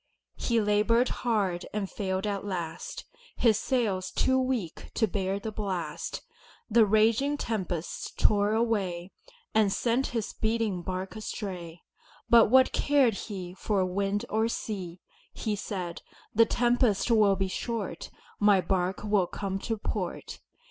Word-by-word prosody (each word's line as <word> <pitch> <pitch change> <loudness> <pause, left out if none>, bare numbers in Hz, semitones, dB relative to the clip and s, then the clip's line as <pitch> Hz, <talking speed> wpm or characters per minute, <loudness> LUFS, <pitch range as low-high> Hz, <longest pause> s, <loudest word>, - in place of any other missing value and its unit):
He 235 -1 +1
labored 215 +4 +3
hard 200 -7 -1
and 205 -2 -1
failed 190 0 -2
at 200 -2 -2
last, 175 -5 -5 0.3
His 220 -3 +3
sails 210 -9 0
too 260 0 +2
weak 255 -10 -2
to 225 - +3
bear 195 -1 -1
the 220 +2 -5
blast, 195 -5 -4 0.5
The 220 -1 +6
raging 225 +7 +3
tempests 185 - -3
tore 205 0 +3
away 195 -6 0 0.4
And 215 -3 +4
sent 240 +6 +1
his 230 -4 -3
beating 220 -4 -1
bark 185 +3 -4
astray. 185 -6 -6 0.5
But 235 -1 +8
what 260 +2 +5
cared 280 -5 +3
he 190 -3 -6
For 195 0 0
wind 200 +4 -1
or 220 +1 +1
sea! 190 -6 -5 0.3
He 215 -2 -2
said, 185 -4 -5 0.3
"The 225 +1 +5
tempest 240 -2 +2
will 210 -3 +5
be 195 0 -1
short, 205 -2 -4 0.3
My 205 -2 +5
bark 185 0 -1
will 205 -4 +2
come 195 0 -4
to 225 +2 -3
port." - - -4
205 Hz, 135 wpm, -28 LUFS, 190-230 Hz, 0.5 s, But